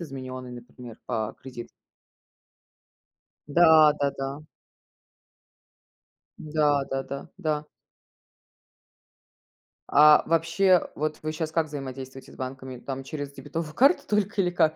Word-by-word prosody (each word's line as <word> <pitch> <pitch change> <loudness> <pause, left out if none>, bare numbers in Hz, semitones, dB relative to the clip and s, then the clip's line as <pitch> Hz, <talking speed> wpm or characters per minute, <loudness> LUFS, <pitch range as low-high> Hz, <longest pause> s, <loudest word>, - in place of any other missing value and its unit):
изменённый, 130 -4 -7
например, 120 -1 -11
по 110 -3 -2
кредит 125 -3 -9 1.8
Да, 155 -1 +6
да-да. 140 0 -2 2.0
Да, 150 -2 +1
да-да. 135 +1 -4
Да. 155 -1 -1 2.3
А 150 +1 +7
вообще, 165 +3 +2
вот 155 +1 -3
вы 155 - -2
щас 155 0 -4
как 160 -2 +1
взаимодействуете 135 -2 -8
с - - -14
банками? 130 0 -7
Там 135 +2 -6
через 145 0 -6
дебетовую 150 +2 -6
карту 275 - +4
только 205 0 0
или 175 - +1
как 160 -3 +2
145 Hz, 100 wpm, -26 LUFS, 130-160 Hz, 2.3 s, А